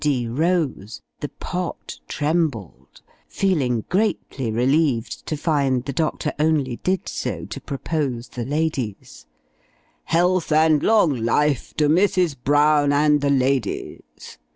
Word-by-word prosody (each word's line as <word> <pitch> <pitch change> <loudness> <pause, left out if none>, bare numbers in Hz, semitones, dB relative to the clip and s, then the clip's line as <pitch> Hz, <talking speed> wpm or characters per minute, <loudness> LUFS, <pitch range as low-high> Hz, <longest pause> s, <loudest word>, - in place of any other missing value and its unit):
D. 130 -5 +1
rose, 145 - -1 0.2
the 145 - -4
"Pott" 180 -1 -6
trembled 145 - -2 0.3
feeling 135 - 0
greatly 185 - -1
relieved 125 +1 0
to 155 - -2
find 140 -5 0
the 140 - -4
doctor 155 0 -1
only 150 -6 +1
did 185 -1 -1
so - - -4
to - - -8
propose 135 -4 -3
the 120 - -5
"ladies" 140 - -3 0.8
"health 175 0 +1
and 155 -1 +4
long 205 -10 +3
life 125 +4 0
to 150 - +2
Mrs. 180 -1 +2
Brown 145 0 +3
and 150 0 +3
the 140 - +1
ladies!" 130 -4 -2
145 Hz, 120 wpm, -22 LUFS, 130-160 Hz, 0.8 s, and